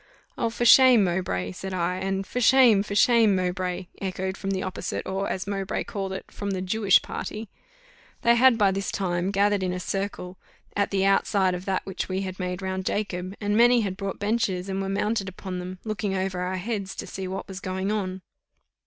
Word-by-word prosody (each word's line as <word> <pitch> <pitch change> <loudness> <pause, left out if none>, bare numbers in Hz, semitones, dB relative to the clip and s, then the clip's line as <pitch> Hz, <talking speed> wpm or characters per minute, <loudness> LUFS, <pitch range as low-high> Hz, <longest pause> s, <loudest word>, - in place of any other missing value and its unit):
"Oh! 230 - 0
for 235 +1 -2
shame, 250 -2 +8
Mowbray!" 170 - -1
said 190 - -6
I. 180 +1 -1
And 195 +1 -2
"For 250 - -3
shame! 245 -5 +6
for 200 0 -5
shame, 225 -2 +5
Mowbray!" 180 0 -2 0.2
echoed 190 0 -3
from 195 - -5
the 190 -1 -1
opposite, 185 0 -4
or, 190 +1 -2
as 185 - -3
Mowbray 195 -1 -2
called 195 -2 -4
it, 190 - -7
from 200 - -5
the 190 -2 -2
Jewish 200 0 +3
party: 215 0 -6 0.7
they 235 - +6
had 240 0 +5
by 200 -3 +4
this 195 +1 -2
time 175 -1 -1
gathered 200 0 +2
in 185 -1 -1
a 180 - -3
circle 190 -1 -4 0.4
at 200 - +1
the 195 -1 +1
outside 195 -1 +2
of 180 +1 -5
that 190 -1 -1
which 190 -1 -4
we 190 +1 -1
had 185 -1 -5
made 180 0 -3
round 190 0 -2
Jacob, 190 -2 -2
and 205 0 0
many 240 +1 +5
had 195 -3 -2
brought 195 0 -4
benches, 200 -3 -1
and 195 0 -2
were 195 - -3
mounted 200 0 -1
upon 185 0 -6
them, 180 +1 -6
looking 205 -2 -2
over 190 -1 -2
our 180 +1 -2
heads 195 -1 -4
to - - -5
see 190 -1 -6
what 190 +1 -5
was 190 -1 -7
going 190 +1 -2
on. 190 -3 -3
195 Hz, 205 wpm, -25 LUFS, 185-205 Hz, 0.7 s, shame